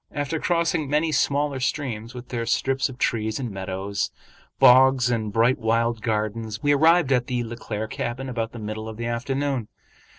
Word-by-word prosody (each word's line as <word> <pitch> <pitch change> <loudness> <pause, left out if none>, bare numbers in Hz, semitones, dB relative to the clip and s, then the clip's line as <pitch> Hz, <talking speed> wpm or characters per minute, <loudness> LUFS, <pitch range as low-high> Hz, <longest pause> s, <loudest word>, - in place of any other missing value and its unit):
After 150 +1 -2
crossing 170 -4 0
many 155 +2 +1
smaller 140 -1 +1
streams 125 -4 -3
with 125 0 -9
their 115 -2 -3
strips 135 +3 +1
of 125 - -10
trees 110 -1 -1
and 125 -4 -4
meadows, 95 +1 -3 0.5
bogs 130 0 +6
and 110 -3 -1
bright 115 +4 +3
wild 115 0 +1
gardens, 110 -1 -2
we 145 0 +4
arrived 160 0 +4
at 125 -2 +2
the 125 -2 -1
Le 120 0 -6
Claire 110 -2 -4
cabin 125 +4 -4
about 115 -3 -3
the - - -9
middle 110 0 -5
of 110 - -8
the 115 - -4
afternoon. 130 +1 -2
120 Hz, 175 wpm, -24 LUFS, 110-135 Hz, 0.5 s, bogs